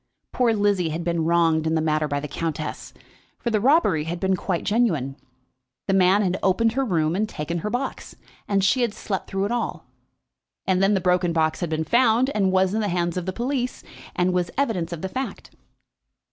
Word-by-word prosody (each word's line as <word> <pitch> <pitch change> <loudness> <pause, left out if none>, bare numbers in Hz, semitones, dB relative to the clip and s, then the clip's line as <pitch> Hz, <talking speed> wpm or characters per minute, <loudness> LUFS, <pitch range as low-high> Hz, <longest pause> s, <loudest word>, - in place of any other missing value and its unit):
Poor 245 -2 +2
Lizzie 205 -5 +1
had 165 +2 -3
been 170 -2 0
wronged 165 -1 +2
in 160 - +1
that 160 - +1
matter 155 -1 +1
by 145 0 -1
the 150 - -5
countess, 155 +1 -4 0.5
for 235 - -3
the 215 -2 +1
robbery 230 - +3
had 170 +2 -4
been 190 0 +1
quite 180 -1 -2
genuine. 180 - +1 0.7
The 195 - 0
man 190 +2 +4
had 185 -1 0
opened 210 +4 +2
her 270 +4 0
room 165 -8 0
and 215 +2 0
taken 170 +3 -4
her 210 - -3
box, 245 +4 -4 0.3
and 195 -1 +1
she 255 +7 +3
had 235 -3 0
slept 195 -3 -4
through 195 +1 -1
it 205 - -3
all. 240 0 -3 0.8
And 190 -1 +2
then 195 +1 +4
the 190 - 0
broken 180 -1 +2
box 160 -1 +1
had 175 - -2
been 160 0 -1
found, 240 - +3
and 195 -5 +1
was 190 0 +2
in 220 - 0
the 210 - 0
hands 175 -1 -1
of 180 0 -3
the - - 0
police, 250 +4 -3 0.3
and 180 0 +1
was 180 -1 0
evidence 220 -12 0
of 170 0 -6
the - - 0
fact. 260 +6 -5
185 Hz, 210 wpm, -24 LUFS, 165-215 Hz, 0.8 s, man